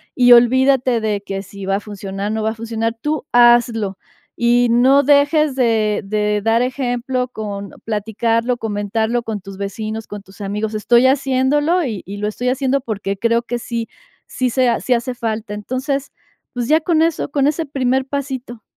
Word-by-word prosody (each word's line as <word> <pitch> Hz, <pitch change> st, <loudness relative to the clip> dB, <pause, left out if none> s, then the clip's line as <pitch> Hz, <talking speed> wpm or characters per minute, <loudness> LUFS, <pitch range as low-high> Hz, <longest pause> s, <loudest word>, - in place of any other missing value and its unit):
y 245 Hz, -1 st, +5 dB
olvídate 255 Hz, +1 st, +5 dB
de 210 Hz, -2 st, -1 dB
que 195 Hz, -1 st, -5 dB
si 200 Hz, 0 st, -9 dB
va 195 Hz, -, +1 dB
a -, -, -1 dB
funcionar, 200 Hz, -1 st, -5 dB
no 220 Hz, 0 st, -2 dB
va 220 Hz, +1 st, 0 dB
a -, -, -8 dB
funcionar, 225 Hz, 0 st, -3 dB
tú 300 Hz, +2 st, -3 dB
hazlo. 240 Hz, -5 st, +4 dB, 0.4 s
Y 240 Hz, 0 st, +3 dB
no 260 Hz, +4 st, +5 dB
dejes 290 Hz, +1 st, +3 dB
de 225 Hz, -5 st, +1 dB
de 210 Hz, +1 st, 0 dB
dar 225 Hz, +2 st, +2 dB
ejemplo 250 Hz, 0 st, -2 dB
con 205 Hz, -4 st, -6 dB, 0.2 s
platicarlo, 225 Hz, +3 st, -1 dB
comentarlo 220 Hz, +2 st, -1 dB
con 220 Hz, -3 st, -5 dB
tus 195 Hz, 0 st, -10 dB
vecinos, 215 Hz, +2 st, -5 dB
con 205 Hz, -1 st, -8 dB
tus 200 Hz, +1 st, -16 dB
amigos: 210 Hz, +2 st, -3 dB
"Estoy 235 Hz, +4 st, +3 dB
haciéndolo 275 Hz, +5 st, +2 dB
y 220 Hz, -7 st, -4 dB
y 200 Hz, +1 st, -6 dB
lo 210 Hz, +1 st, -2 dB
estoy 245 Hz, +4 st, -2 dB
haciendo 270 Hz, +1 st, 0 dB
porque 205 Hz, -5 st, -3 dB
creo 230 Hz, +3 st, +1 dB
que 240 Hz, 0 st, -4 dB
sí, 235 Hz, -1 st, -4 dB, 0.4 s
sí 255 Hz, -1 st, -2 dB
se 255 Hz, 0 st, +2 dB
ha 235 Hz, -, +1 dB
sí 255 Hz, -, 0 dB
hace 245 Hz, +1 st, -1 dB
falta". 220 Hz, -3 st, -4 dB
Entonces, 260 Hz, +6 st, -3 dB, 0.4 s
pues 245 Hz, -2 st, -3 dB
ya 310 Hz, +3 st, +4 dB
con 320 Hz, -1 st, +2 dB
eso, 330 Hz, -2 st, -1 dB
con 280 Hz, -1 st, +1 dB
ese 310 Hz, +2 st, -1 dB
primer 265 Hz, -1 st, 0 dB
pasito. 265 Hz, -4 st, -5 dB
235 Hz, 180 wpm, -18 LUFS, 215-260 Hz, 0.4 s, y